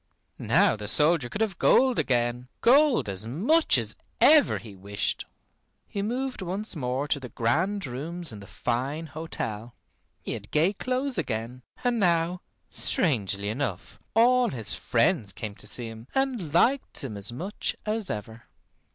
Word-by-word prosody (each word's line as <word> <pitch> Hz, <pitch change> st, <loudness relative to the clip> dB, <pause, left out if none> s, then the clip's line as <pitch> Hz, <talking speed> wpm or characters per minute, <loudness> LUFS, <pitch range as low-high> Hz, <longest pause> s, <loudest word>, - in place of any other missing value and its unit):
Now -, -, +3 dB
the 105 Hz, -1 st, -7 dB
soldier 150 Hz, +2 st, +3 dB
could 205 Hz, -, -5 dB
have 205 Hz, -5 st, -1 dB
gold 260 Hz, -1 st, +4 dB
again. 120 Hz, 0 st, 0 dB
Gold 275 Hz, -, +5 dB
as 100 Hz, +2 st, 0 dB
much 235 Hz, -, +3 dB
as -, -, -1 dB, 0.2 s
ever 305 Hz, -1 st, +6 dB
he 110 Hz, -4 st, -11 dB
wished. 100 Hz, +2 st, -2 dB, 0.6 s
He 200 Hz, -, -4 dB
moved 250 Hz, +4 st, -3 dB
once 190 Hz, +3 st, -4 dB
more 130 Hz, 0 st, -2 dB
to 145 Hz, -, 0 dB
the 125 Hz, -2 st, -8 dB
grand 175 Hz, -, 0 dB
rooms 160 Hz, +7 st, -1 dB
in 105 Hz, -, -9 dB
the 100 Hz, -, -12 dB
fine 135 Hz, +7 st, -2 dB
hotel. 120 Hz, -8 st, -6 dB, 0.5 s
He -, -, -4 dB
had -, -, -8 dB
gay 165 Hz, +6 st, +2 dB
clothes 255 Hz, +1 st, -1 dB
again; 120 Hz, -3 st, -4 dB, 0.2 s
and 245 Hz, -2 st, +1 dB
now, 175 Hz, -1 st, +1 dB, 0.3 s
strangely 100 Hz, -, 0 dB
enough, 110 Hz, -5 st, -4 dB, 0.2 s
all 245 Hz, +2 st, +5 dB
his 115 Hz, -5 st, -1 dB
friends 115 Hz, -, +1 dB
came 105 Hz, +2 st, -6 dB
to 105 Hz, -, -5 dB
see 120 Hz, +3 st, +1 dB
him 115 Hz, +1 st, -9 dB
and 255 Hz, -, -1 dB
liked 255 Hz, -, +2 dB
him 120 Hz, -6 st, -5 dB
as 100 Hz, +2 st, -2 dB
much 180 Hz, -, -4 dB
as 215 Hz, -1 st, -1 dB
ever. 110 Hz, +2 st, -6 dB
150 Hz, 155 wpm, -27 LUFS, -, 0.6 s, ever